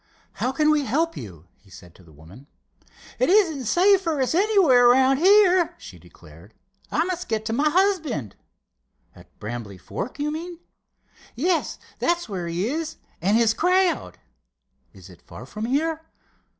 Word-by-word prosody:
"How 255 - -2
can 300 +3 +2
we 300 -1 +1
help 320 +8 -1
you?" 85 -6 -10
he 100 - -26
said 90 -2 -15
to - - -20
the 80 - -19
woman. 80 - -16 0.7
"It - - +2
isn't 340 - +2
safe 380 - +3
for 325 -5 -2
us 260 +2 0
anywhere 345 - +4
around 265 +2 +4
here," 370 0 +4
she 90 - -13
declared. 85 +3 -18 0.4
"I 320 - +1
must 360 0 -4
get 220 -1 -2
to 225 - -2
my 290 +6 +2
husband." 320 - 0 0.8
"At - - -17
Brambly 105 -3 -7
Fork, 195 - -7
you 295 +1 -2
mean?" 340 +3 -6 0.8
"Yes, 330 +7 -1 0.2
that's 345 -3 0
where 185 -5 -5
he 175 +5 -2
is, 315 +4 -4 0.3
and 200 +6 +2
his 230 -2 +3
crowd." 365 +4 0 0.7
"Is - - -15
it - - -17
far - - -12
from 215 +1 -6
here?" 310 +6 -1
275 Hz, 160 wpm, -23 LUFS, -, 0.8 s, anywhere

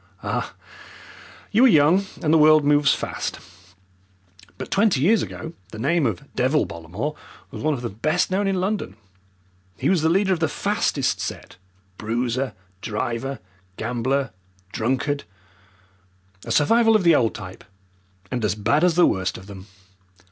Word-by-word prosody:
"Ah, - - -3 1.0
you 225 +4 +4
are - - +8
young 180 - +4 0.2
and 155 0 +2
the - - +6
world 155 -1 +6
moves 145 -1 +4
fast, - - -3 1.2
but - - -7
twenty 200 -7 +3
years 205 +10 +3
ago 160 - -6 0.2
the - - -8
name 145 +7 +1
of - - -4
'Devil' 135 +5 +2
Bollamore 90 - -5 0.4
was - - -7
one 155 0 +1
of 125 - -8
the 120 - -2
best 155 - 0
known 195 +2 +1
in 195 -1 0
London. 190 - -2 0.8
He - - 0
was 180 -4 +2
the 160 - +2
leader 190 +2 +2
of 175 - -2
the 160 - +1
fastest 200 - -1
set, - - -6 0.4
bruiser, 120 +4 -2 0.3
driver, 115 +5 -3 0.4
gambler, 125 +3 -1 0.4
drunkard 135 +6 -1 1.2
a - - -5
survival 225 +9 +4
of 210 - +3
the 170 -1 +6
old 120 -6 +2
type, 95 -3 -9 0.7
and 120 -3 -2
as 105 -2 +1
bad 115 +9 +1
as 180 -2 +3
the 175 - +6
worst 95 -2 -1
of 95 - -12
them." 100 -1 -11
145 Hz, 155 wpm, -23 LUFS, 115-175 Hz, 1.2 s, are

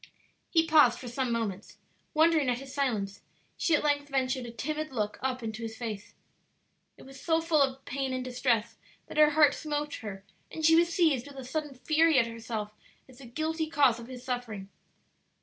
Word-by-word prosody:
He 325 -1 +3
paused 300 -7 +5
for 255 - -9
some 245 +1 -2
moments. 215 -4 -3 0.4
Wondering 315 -3 +4
at 245 - +1
his 270 +1 -10
silence, 215 -8 -1 0.3
she 330 - +2
at - - 0
length 290 -1 +1
ventured 260 -2 -1
a - - -7
timid 305 +5 -4
look 210 -4 -2
up 255 -1 -2
into 220 0 -5
his 225 -1 -6
face. 220 -4 -6 0.8
It - - -14
was 270 0 -13
so 325 -1 +2
full 325 -2 +2
of 270 -1 0
pain 270 0 -2
and 255 0 -3
distress 240 -3 0 0.3
that - - -9
her 300 0 +7
heart 300 -1 +5
smote 295 -1 -3
her, 200 -3 -7 0.3
and 315 - -3
she 325 +1 +7
was 340 +1 +4
seized 315 -8 +2
with 280 -1 -12
a 265 - -6
sudden 295 +1 -4
fury 310 +4 +3
at 245 - +5
herself 225 -2 -5 0.4
as 260 -1 -17
the 265 - -11
guilty 315 +5 -2
cause 280 -7 +3
of 235 - -9
his 250 -1 -9
suffering. 235 -6 -4
265 Hz, 195 wpm, -29 LUFS, 235-305 Hz, 0.8 s, her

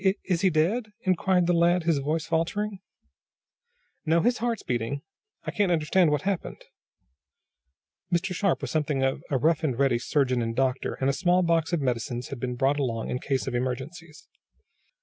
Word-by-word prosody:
"Is 190 0 +3
is 180 -3 0
he 190 - +4
dead?" 205 +8 0
inquired 185 -1 +2
the 175 - +2
lad, 170 +1 +3
his 160 -3 +2
voice 155 +3 -1
faltering. 190 +5 -1 1.2
"No, 165 +1 +3
his 240 +4 +1
heart's 235 0 -2
beating. 125 +3 -2 0.4
I - - -4
can't 200 -3 +1
understand 170 +2 +3
what 150 -1 0
happened." 195 -3 -3 1.5
Mr. 175 +2 0
Sharp 195 0 0
was - - -3
something 150 -3 0
of 135 0 0
a 140 - +1
rough 160 +4 +2
and 135 -6 0
ready 135 -3 +2
surgeon 130 0 +1
and 115 0 -2
doctor, 130 0 0
and 135 - -1
a 140 - +2
small 180 +4 +2
box 165 -1 +1
of 170 -3 0
medicines 120 -1 -2
had 135 - -6
been 125 0 -3
brought 135 +4 +1
along 115 -5 -2
in 125 - -2
case 135 -1 -1
of 130 - -4
emergencies. 135 +7 -5
155 Hz, 180 wpm, -26 LUFS, 135-175 Hz, 1.5 s, he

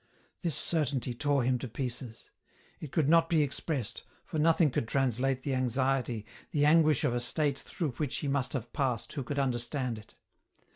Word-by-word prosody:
This 170 -5 0
certainty 140 -6 0
tore 140 +1 +1
him 125 0 +1
to 130 - -5
pieces. 125 0 -6 0.5
It 150 - -7
could 155 -4 +2
not 165 +1 +5
be 160 -3 +4
expressed, 140 -3 -3 0.2
for 155 - -3
nothing 160 -1 +4
could 115 - -1
translate 130 0 +1
the 140 - -1
anxiety, 130 -3 0 0.2
the 145 -1 +2
anguish 155 0 +5
of 120 - +2
a 120 - 0
state 140 +3 +1
through 160 -6 -3
which 145 -4 -1
he 145 - -3
must 135 -2 0
have 120 -3 -4
passed 130 -5 -1
who 145 - -3
could 145 +3 -4
understand 125 -2 -1
it. 105 - -17
135 Hz, 180 wpm, -30 LUFS, 125-150 Hz, 0.5 s, not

